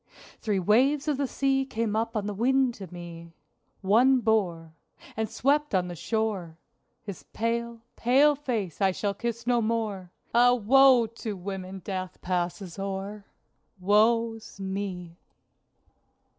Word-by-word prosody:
Three 210 -4 -1
waves 260 - +2
of 295 -3 +1
the 280 -1 -1
sea 270 0 +1
came 225 -4 -2
up 225 +1 -1
on 205 - -2
the 210 - -3
wind 255 +4 +2
to 190 -6 -10
me. 170 -1 -10 0.5
One 240 +7 +4
bore 180 -8 0 0.4
And 220 -1 -2
swept 285 +2 +1
on 180 -1 +1
the 175 - -6
shore 200 -4 -2 0.5
His 200 -4 -8
pale, 235 +1 -2
pale 275 +5 +4
face 230 - -4
I 190 -1 +3
shall 200 +1 -2
kiss 235 +2 -4
no 240 -1 +2
more! 215 -5 -2 0.2
Ah, 245 +1 +5
woe 250 +1 +5
to 225 -1 -6
women 190 0 -6
death 185 -2 -5
passes 180 +1 -3
o'er! 195 +1 -5 0.5
(Woe's 225 +3 +1
me!) 190 -3 -5
215 Hz, 135 wpm, -27 LUFS, 190-235 Hz, 0.5 s, Ah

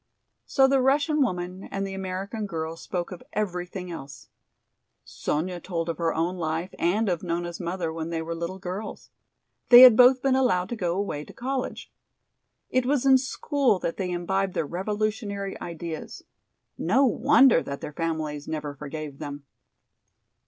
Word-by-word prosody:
So 270 -1 +4
the 270 0 +3
Russian 290 +3 +2
woman 180 -5 -2
and 195 0 -3
the 195 - -5
American 195 +3 -4
girl 160 -2 -4
spoke 175 +2 -4
of 180 - -8
everything 180 -2 -3
else. 140 -4 -9 0.8
Sonya 175 +4 -3
told 170 -1 -3
of 165 - -4
her 165 -1 +1
own 170 +3 -1
life 165 +2 -3
and 205 +6 +1
of 175 -3 0
Nona's 175 -1 -3
mother 170 -2 -3
when 165 0 -4
they 165 -1 -2
were 165 +1 -4
little 170 +3 -4
girls. 190 +3 -7 0.6
They 245 0 +11
had 255 -3 +11
both 250 +2 +6
been 270 -1 +3
allowed 210 -9 +2
to 240 - -3
go 175 -5 -1
away 195 -7 -2
to - - -13
college. 260 +1 -4 0.8
It 255 -1 +1
was 275 -1 +1
in 265 -1 +7
school 275 -3 +1
that 170 -2 -3
they 185 -2 -2
imbibed 190 +2 -1
their - - 0
revolutionary 205 - -3
ideas. 165 -1 -6 0.6
No 240 +12 +3
wonder 255 -3 +5
that 140 0 -6
their 150 - -6
families 155 -2 -3
never 150 -2 -4
forgave 150 0 -7
them! 145 -2 -7
180 Hz, 160 wpm, -26 LUFS, 165-220 Hz, 0.8 s, They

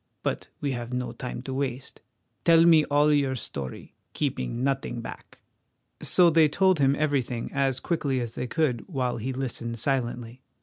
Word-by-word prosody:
But - - -2
we 140 - 0
have 120 -1 -5
no 125 0 -2
time 125 0 -6
to 130 - -5
waste. 130 -1 -4 0.4
Tell 165 0 +6
me 160 -3 +6
all 145 +1 +3
your 140 -2 +2
story, 70 - -6 0.2
keeping 65 - -2
nothing 135 -3 -1
back." 115 - -10 0.6
So 175 -2 +5
they 160 -1 +5
told 185 +2 +3
him 135 0 +4
everything 135 -6 -1
as 135 -2 +1
quickly 145 -6 -1
as 120 -2 -4
they 125 - -4
could, 125 -3 0
while 130 -8 -1
he 120 +4 -3
listened 120 -3 -4
silently. 120 -1 -2
135 Hz, 165 wpm, -26 LUFS, 120-145 Hz, 0.6 s, Tell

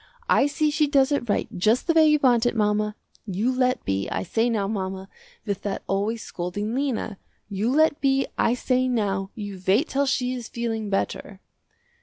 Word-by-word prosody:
I 280 - +4
see 300 +1 0
she 305 0 +2
does 280 -1 +3
it 260 -5 -1
right 205 - +1
just 215 +7 +2
the 335 - +2
way 320 -1 +6
you 300 0 +5
want 245 -2 +4
it 240 - -1
mama. 210 -1 +1 0.3
You 205 +6 0
let 255 0 0
be, 95 0 -1
I 95 - -2
say 225 - 0
now 210 -4 0
mama, 190 -2 -4 0.4
with 200 -3 -3
that 200 -1 -4
always 205 +3 -1
scolding 205 +5 -4
Lena. 250 -6 -2 0.3
You 205 +3 -1
let 310 +1 +3
be, 270 -1 +2
I 235 - +2
say 255 0 +1
now, 200 -6 -1
you 205 -4 -7
wait 220 - +3
till 280 +1 +1
she 255 -1 0
is 245 -2 -6
feeling 225 -3 -3
better." 195 0 -3
225 Hz, 190 wpm, -24 LUFS, 200-265 Hz, 0.4 s, way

